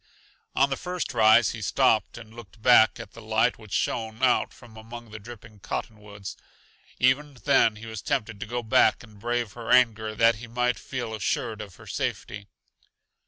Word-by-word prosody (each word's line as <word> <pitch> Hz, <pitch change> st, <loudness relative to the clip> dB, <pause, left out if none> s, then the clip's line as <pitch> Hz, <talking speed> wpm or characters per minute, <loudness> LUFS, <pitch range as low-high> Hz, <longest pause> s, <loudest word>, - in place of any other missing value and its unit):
On 140 Hz, +1 st, +3 dB
the 135 Hz, -, -1 dB
first 180 Hz, -4 st, -4 dB
rise 110 Hz, 0 st, +5 dB
he 115 Hz, -, -7 dB
stopped 115 Hz, +1 st, +2 dB
and 110 Hz, -2 st, -12 dB
looked 115 Hz, -3 st, -13 dB
back 110 Hz, -3 st, +5 dB
at -, -, -9 dB
the 115 Hz, -, -12 dB
light 110 Hz, +2 st, +1 dB
which 110 Hz, -3 st, -14 dB
shone 110 Hz, +1 st, -2 dB
out 125 Hz, -1 st, +3 dB
from 120 Hz, -3 st, -16 dB
among 115 Hz, +1 st, -10 dB
the 110 Hz, -, -8 dB
dripping 115 Hz, -1 st, -13 dB
cottonwoods. 100 Hz, 0 st, -7 dB, 0.6 s
Even 135 Hz, +3 st, +2 dB
then 110 Hz, +2 st, +4 dB
he 110 Hz, +2 st, -10 dB
was 110 Hz, -3 st, -7 dB
tempted 110 Hz, -5 st, -2 dB
to 115 Hz, -, -6 dB
go 120 Hz, +1 st, -3 dB
back 110 Hz, 0 st, +3 dB
and 105 Hz, -3 st, -16 dB
brave 120 Hz, -1 st, -2 dB
her 115 Hz, -1 st, -8 dB
anger 110 Hz, -3 st, +3 dB
that 115 Hz, 0 st, +4 dB
he 120 Hz, +2 st, -9 dB
might 125 Hz, +1 st, 0 dB
feel 120 Hz, -4 st, -5 dB
assured 110 Hz, +1 st, -2 dB
of 100 Hz, -4 st, -10 dB
her -, -, -15 dB
safety. 100 Hz, -1 st, -4 dB
115 Hz, 180 wpm, -26 LUFS, 110-120 Hz, 0.6 s, rise